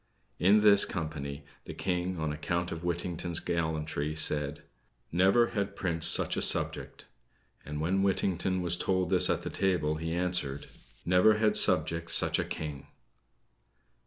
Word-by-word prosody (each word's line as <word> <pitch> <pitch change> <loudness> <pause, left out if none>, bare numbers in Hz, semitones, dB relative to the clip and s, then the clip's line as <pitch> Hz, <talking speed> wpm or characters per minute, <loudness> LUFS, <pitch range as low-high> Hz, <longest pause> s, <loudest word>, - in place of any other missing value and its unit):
In 100 +4 +4
this 100 -1 +6
company, 75 -5 -5 0.2
the - - -9
King, 90 0 -3
on 80 -1 -2
account 85 +3 -3
of 80 - -6
Whittington's 85 -1 -2
gallantry, 80 -2 -3
said: 75 -1 -1 0.5
"Never 95 +7 +3
had 100 -3 -3
prince 85 -4 0
such - - +3
a - - -2
subject;" - - 0 0.6
and 75 0 -6
when 90 +5 0
Whittington 95 -1 -1
was 90 0 0
told 95 -1 -1
this 90 - +6
at - - -1
the - - -5
table, 85 -5 -1
he 80 +1 -5
answered: 85 -6 -1 0.4
"Never 90 +5 +4
had 110 0 +1
subject 85 0 +3
such - - +1
a - - 0
king." 75 -3 -7
85 Hz, 145 wpm, -29 LUFS, 80-95 Hz, 0.6 s, this